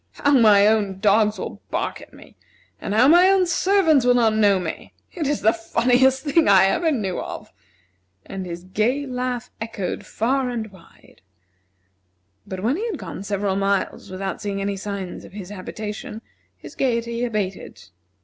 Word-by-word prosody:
How 285 - 0
my 215 -7 +6
own 210 -3 +1
dogs 210 +1 +3
will - - -7
bark - - -3
at - - -14
me! - - -16 0.4
And 205 - -3
how 245 +4 +5
my 350 +5 +6
own 385 -1 +4
servants 345 -5 +3
will 245 0 +4
not 230 -3 +3
know 205 -3 +3
me! 170 -3 -6 0.2
It 320 -6 -3
is 290 0 -1
the 220 +2 +4
funniest 250 +4 +2
thing 310 +2 +2
I 190 -1 +6
ever 320 - +1
knew 205 - -2
of!" - - -7 0.7
And 190 -1 -6
his 170 0 -7
gay 220 +9 -1
laugh 250 -1 -4
echoed 225 -5 -4
far 255 +3 0
and 225 -3 -4
wide. 190 -3 -20 1.3
But 185 -1 -6
when 250 +8 +1
he 440 - -3
had 415 -8 -4
gone 185 -4 -8
several 200 -1 -2
miles 195 0 -1
without 190 +1 -5
seeing 200 -1 -3
any 200 0 -2
signs 195 -2 -6
of - - -14
his 195 -3 -8
habitation, 210 +2 -7 0.3
his - - -12
gayety 235 -2 -1
abated. 210 -5 -4
220 Hz, 170 wpm, -22 LUFS, 195-255 Hz, 1.3 s, my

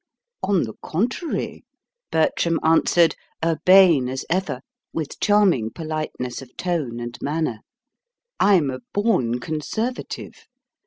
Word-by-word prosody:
"On 195 -4 +2
the 110 - -5
contrary," 240 - -2 0.5
Bertram 165 +1 +2
answered, 165 +1 +4 0.3
urbane 165 -4 +5
as 130 0 -4
ever, 190 +2 -1 0.3
with 155 -3 -5
charming 195 - +3
politeness 155 -4 -4
of 130 -1 -14
tone 155 -10 -2
and 120 0 -5
manner: 150 -6 -1 0.8
"I'm 180 -9 +4
a 130 - -5 0.2
born 180 - +1
conservative. 220 - -4
160 Hz, 105 wpm, -23 LUFS, 130-185 Hz, 0.8 s, urbane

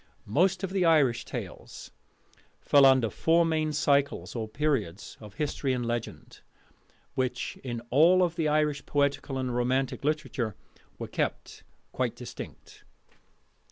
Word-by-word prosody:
Most 180 - +1
of 190 - -2
the 190 -1 +1
Irish 150 -8 +3
tales - - -8 0.7
fall 140 -2 +6
under 130 -5 +4
four 165 +1 +3
main 155 -1 0
cycles 140 - +1
or 110 -2 -3
periods 110 - -2
of 105 -2 -12
history 145 -2 -1
and 125 -1 -2
legend, 115 -1 -5 0.7
which, 130 -2 -2
in 120 -3 -4
all 175 +7 +5
the 165 -2 -2
Irish 150 -1 +1
poetical 140 -1 0
and 130 -2 -2
romantic 130 +3 0
literature, 140 -8 -2 0.4
were - - -5
kept - - -4 0.3
quite - - -2
distinct. - - -10
140 Hz, 125 wpm, -28 LUFS, 120-155 Hz, 0.7 s, fall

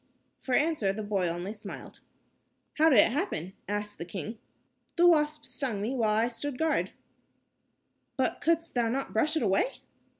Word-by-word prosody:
For 255 - -1
answer, 295 -10 +2
the 215 +2 -5
boy 200 -3 0
only 175 +4 -3
smiled. 215 - -9 0.8
"How 320 +1 +7
did 265 - +5
it 210 - +6
happen?" 240 - -2 0.2
asked 205 0 -3
the - - -3
king. 210 +5 -6 0.6
"The 345 - +4
wasp 305 -3 +3
stung 255 -5 -3
me 220 +6 -2
while 220 -5 +1
I 225 +2 +3
stood 250 +3 -4
guard." 320 +2 +1 1.3
"But 260 - 0
couldst 330 +1 +1
thou 235 -2 +1
not 270 +3 -2
brush 310 +8 +2
it - - 0
away?" 195 - +1
240 Hz, 165 wpm, -29 LUFS, 205-300 Hz, 1.3 s, How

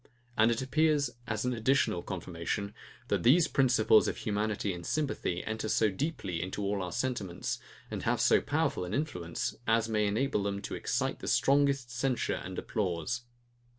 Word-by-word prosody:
And 110 +1 +5
it 120 +2 0
appears, 145 0 +2 0.2
as 110 +1 -2
an 125 - +1
additional 120 -6 +2
confirmation, 95 +3 -4 0.4
that - - +1
these 155 +8 +5
principles 120 -7 +4
of - - -2
humanity 105 -1 -1
and 85 -1 -7
sympathy 140 - -1
enter 110 0 -3
so 110 -1 +3
deeply 95 - -3
into 95 +3 -3
all 100 0 0
our 90 -1 -4
sentiments, 120 -8 -2 0.3
and - - -3
have - - +1
so - - +5
powerful - - 0
an 90 +3 -3
influence, 90 - -2
as 115 0 +3
may 105 -1 +2
enable 110 +2 +1
them 100 0 -2
to - - -5
excite - - -1
the - - -7
strongest 140 -3 +3
censure 125 +1 -1
and 95 0 -7
applause. 105 +3 -2
110 Hz, 165 wpm, -31 LUFS, 95-130 Hz, 0.4 s, And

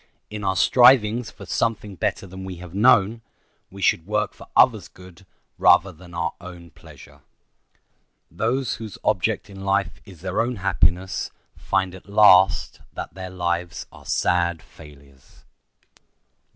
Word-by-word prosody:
In 105 -1 -6
our 95 -1 0
strivings 120 -1 +4
for - - -13
"something 105 -3 -2
better 95 - -2
than 95 0 -10
we 95 -1 -7
have 90 0 -11
known" 115 0 +3 0.5
we 100 0 -9
should 85 - +1
work 105 -1 -1
for - - -15
others' - - +4
good 90 0 -17 0.3
rather 95 +3 +5
than 85 +1 -15
our 85 0 -2
own 85 -2 -11
pleasure. - - -16 1.1
Those 125 +2 -1
whose 110 -3 -9
object - - 0
in 95 -1 -11
life 95 -2 -1
is 95 -6 -15
their 95 +2 -1
own 120 +2 -2
happiness 95 -2 0 0.3
find 95 -1 -1
at 95 +1 -14
last 95 -3 +4
that - - -7
their 95 +1 -8
lives 85 -2 -3
are - - -15
sad 85 -1 0
failures. 70 -4 -18
95 Hz, 140 wpm, -23 LUFS, 85-105 Hz, 1.1 s, rather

